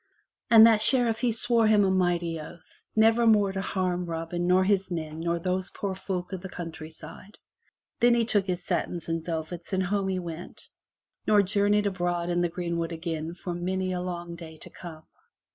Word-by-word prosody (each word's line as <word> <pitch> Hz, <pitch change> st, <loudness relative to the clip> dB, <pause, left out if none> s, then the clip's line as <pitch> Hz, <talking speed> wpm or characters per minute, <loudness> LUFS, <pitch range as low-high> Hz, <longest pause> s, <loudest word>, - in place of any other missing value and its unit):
And 225 Hz, -1 st, +9 dB
that 225 Hz, -2 st, +5 dB
Sheriff 235 Hz, -2 st, +3 dB
he 245 Hz, -1 st, +1 dB
swore 230 Hz, 0 st, +3 dB
him 210 Hz, -1 st, +5 dB
a 190 Hz, -, +2 dB
mighty 175 Hz, -3 st, 0 dB
oath, 160 Hz, +2 st, -13 dB
never 225 Hz, +2 st, +4 dB
more 205 Hz, -3 st, +4 dB
to 195 Hz, 0 st, -3 dB
harm 180 Hz, -2 st, -2 dB
Robin 165 Hz, +1 st, -3 dB
nor 185 Hz, +1 st, +4 dB
his 195 Hz, 0 st, +1 dB
men 160 Hz, -3 st, -4 dB
nor 170 Hz, +1 st, -1 dB
those 185 Hz, +2 st, -2 dB
poor 200 Hz, -2 st, -4 dB
folk 185 Hz, -1 st, -5 dB
of 185 Hz, -, -4 dB
the 190 Hz, -, -7 dB
countryside. 165 Hz, +3 st, -9 dB, 0.6 s
Then 240 Hz, 0 st, +5 dB
he 235 Hz, -1 st, +2 dB
took 205 Hz, -4 st, +1 dB
his 180 Hz, -1 st, -3 dB
satins 175 Hz, -2 st, -2 dB
and 165 Hz, -1 st, -2 dB
velvets 170 Hz, +2 st, -5 dB
and 190 Hz, 0 st, +1 dB
home 195 Hz, +1 st, -1 dB
he 190 Hz, -1 st, -1 dB
went, 170 Hz, -1 st, -8 dB, 0.6 s
nor 210 Hz, -1 st, +5 dB
jour 200 Hz, +1 st, +1 dB
neyed 210 Hz, 0 st, +3 dB
abroad 175 Hz, -2 st, -1 dB
in 175 Hz, 0 st, +1 dB
the 175 Hz, -, +1 dB
greenwood 170 Hz, -1 st, -3 dB
again 165 Hz, 0 st, -4 dB
for 180 Hz, -1 st, -5 dB
many 185 Hz, +2 st, -2 dB
a 180 Hz, -, -2 dB
long 175 Hz, -1 st, -5 dB
day 160 Hz, -2 st, -10 dB
to -, -, -10 dB
come. 160 Hz, -3 st, -10 dB
180 Hz, 195 wpm, -27 LUFS, 170-200 Hz, 0.6 s, And